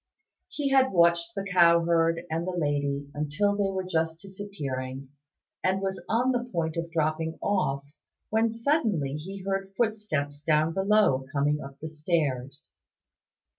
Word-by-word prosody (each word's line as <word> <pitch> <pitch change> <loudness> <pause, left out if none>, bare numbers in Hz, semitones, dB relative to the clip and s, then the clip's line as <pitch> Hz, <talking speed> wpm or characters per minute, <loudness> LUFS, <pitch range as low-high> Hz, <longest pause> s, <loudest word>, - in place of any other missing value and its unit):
He 285 -2 -2
had 265 -1 +4
watched 170 +4 +3
the 195 - -2
Cow 170 -3 +5
herd 165 0 +2
and 165 +2 -1
the 185 - -2
Lady 145 -2 -1
until 155 +8 0
they 200 -1 +1
were 190 -1 -2
just 165 -2 -1
disappearing, 140 -10 -6 0.5
and 190 +1 +2
was 195 0 -3
on 245 +4 +2
the 245 -1 0
point 160 -3 -1
of 170 0 -3
dropping 160 0 -1
off, 140 -9 0 0.5
when 225 +1 +3
suddenly 225 - 0
he 190 +5 -7
heard 195 0 -3
footsteps 200 -11 -1
down 155 +1 +2
below 190 -9 +3
coming 150 +1 +1
up 135 0 -9
the 160 - -5
stairs. 150 -4 -2
170 Hz, 145 wpm, -27 LUFS, 150-195 Hz, 0.5 s, Cow